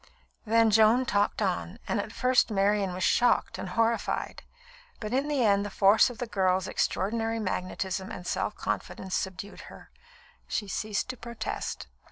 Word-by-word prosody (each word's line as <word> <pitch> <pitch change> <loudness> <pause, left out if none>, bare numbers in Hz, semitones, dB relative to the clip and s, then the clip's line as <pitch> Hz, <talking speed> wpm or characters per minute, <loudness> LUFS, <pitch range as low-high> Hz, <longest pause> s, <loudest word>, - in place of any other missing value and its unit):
Then 225 0 +4
Joan 220 +4 +5
talked 205 -1 +1
on, 185 +1 -2
and 225 - 0
at 210 - -4
first 250 +2 +2
Marian 200 -1 +1
was 185 - -3
shocked 245 +5 +2
and 190 - -5
horrified; 230 +4 -1 0.6
but 215 +1 -5
in 275 +3 +1
the 280 -5 +1
end 200 -1 +3
the 205 - -4
force 200 +4 +5
of 245 - -9
the 245 - -3
girl's 190 -4 +1
extraordinary 225 +3 -1
magnetism 190 -1 -3
and 180 - -7
self - - -2
confidence 190 -1 -4
subdued 190 +2 -4
her. - - -14 0.6
She 205 - -2
ceased 210 +1 -2
to 255 - -5
protest. 235 0 -5
210 Hz, 160 wpm, -28 LUFS, 190-230 Hz, 0.6 s, Joan